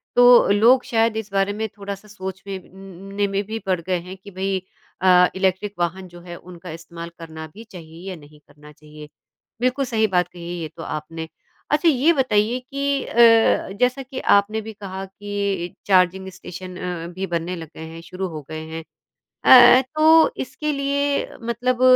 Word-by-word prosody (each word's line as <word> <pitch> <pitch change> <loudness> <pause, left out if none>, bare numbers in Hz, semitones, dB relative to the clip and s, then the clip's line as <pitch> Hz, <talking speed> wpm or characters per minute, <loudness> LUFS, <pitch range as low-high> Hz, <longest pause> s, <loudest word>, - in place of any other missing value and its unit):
तो 245 0 +7
लोग 235 +6 +5
शायद 225 -1 +1
इस 210 -2 -5
बारे 195 +1 +1
में 220 +1 -3
थोड़ा-सा 200 0 -7
सोच 190 -2 -7
में 195 -1 -4
न 195 +1 -13
न - - -10
ने 205 0 +1
में 200 +3 -3
पड़ 185 -2 0
गए 185 +2 -1
हैं 185 +2 -10
कि 200 +2 -13
भई 190 +1 -2 0.4
अ, 180 -1 +6
इलेक्ट्रिक 190 +2 0
वाहन 185 +2 -2
जो 175 0 -14
है 175 0 -9
उनका 180 0 -12
इस्तेमाल 170 +1 -9
करना 160 -1 -8
भी 220 - -11
चाहिए 175 -3 -11
या 185 - -5
नहीं 150 -2 -16
करना 150 0 -17
चाहिए। 150 0 -13 0.5
बिल्कुल 255 +2 +1
सही 220 -3 +1
बात 180 -3 +1
कही 175 -1 -11
है 175 - -4
ये 160 - -3
तो 165 - -7
आपने। 160 +2 -6 0.4
अच्छा 300 +3 +4
ये 300 +3 +3
बताइए 240 -4 +1
कि 275 +1 -2
अ, - - -9 0.6
जैसा 250 +2 +1
कि 260 0 -7 0.2
आपने 215 +2 -1
भी 220 +1 -8
कहा 195 -2 -7
कि 200 -2 -4
चार्जिंग 190 0 +3
स्टेशन 185 0 -9
अ, 175 -2 -5
भी 190 +2 -4
बनने 170 +1 -2
लग 165 -2 -8
गए 160 - -8
हैं, 165 +1 -10
शुरू 185 +3 -5
हो 155 -3 -7
गए 155 0 -5
हैं। 160 0 -6 0.6
अ 245 -1 +9
अ, - - +2
तो 315 +1 +6
इसके 300 +3 -4
लिए 280 0 0
मतलब 245 +2 -1
195 Hz, 190 wpm, -22 LUFS, 175-225 Hz, 0.6 s, अ